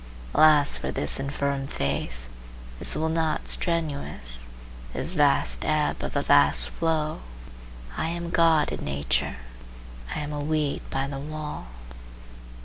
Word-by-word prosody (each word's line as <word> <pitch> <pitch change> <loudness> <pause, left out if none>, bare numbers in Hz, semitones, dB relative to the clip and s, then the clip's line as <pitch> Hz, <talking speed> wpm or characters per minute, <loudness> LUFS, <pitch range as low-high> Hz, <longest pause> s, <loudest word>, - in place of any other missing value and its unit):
Alas 150 -2 +6
for - - -4
this 75 - -1
infirm 140 0 -2
faith, 70 - -3 0.5
this - - +3
will 160 - 0
not 160 -1 0
strenuous, 140 - -1 0.5
this 175 - +1
vast 145 -4 +2
ebb 155 -1 +1
of - - -4
a - - +1
vast - - +4
flow! 155 - -1 0.7
I 160 - -1
am 170 0 -4
God 165 -3 +4
in - - -4
nature; 70 -3 -1 0.8
I - - -2
am 150 0 -4
a 145 - -3
weed 150 -1 0
by 135 0 -1
the 135 -1 -5
wall. 150 - -6
150 Hz, 135 wpm, -26 LUFS, 135-155 Hz, 0.8 s, Alas